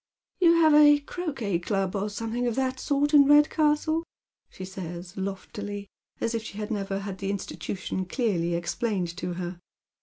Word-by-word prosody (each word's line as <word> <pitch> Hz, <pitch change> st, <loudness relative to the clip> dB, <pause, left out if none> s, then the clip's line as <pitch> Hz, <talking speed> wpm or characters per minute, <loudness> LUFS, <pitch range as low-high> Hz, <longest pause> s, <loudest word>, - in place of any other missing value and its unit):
" -, -, -54 dB
You 335 Hz, -2 st, +7 dB
have 320 Hz, -2 st, +5 dB
a 295 Hz, 0 st, +8 dB
croquet 280 Hz, -, -3 dB
club, 195 Hz, +1 st, -1 dB
or 205 Hz, +1 st, -1 dB
something 230 Hz, +3 st, -2 dB
of 235 Hz, -, -1 dB
that 260 Hz, -1 st, -1 dB
sort 290 Hz, +1 st, +1 dB
in 285 Hz, -1 st, +8 dB
Red 295 Hz, +1 st, +6 dB
castle," 315 Hz, +1 st, +2 dB, 0.5 s
she 185 Hz, -, -8 dB
says, 175 Hz, -2 st, -7 dB
loftily, 200 Hz, +1 st, -5 dB, 0.3 s
as 230 Hz, -, -1 dB
if 230 Hz, -, -1 dB
she 215 Hz, -2 st, -9 dB
had 210 Hz, +1 st, -4 dB
never 195 Hz, -2 st, -2 dB
had 195 Hz, -2 st, -6 dB
the 195 Hz, -, -3 dB
institution 190 Hz, -1 st, -4 dB
clearly 180 Hz, -6 st, 0 dB
explained 175 Hz, 0 st, -2 dB
to 180 Hz, -1 st, -3 dB
her. 175 Hz, 0 st, -5 dB
205 Hz, 175 wpm, -27 LUFS, 190-280 Hz, 0.5 s, a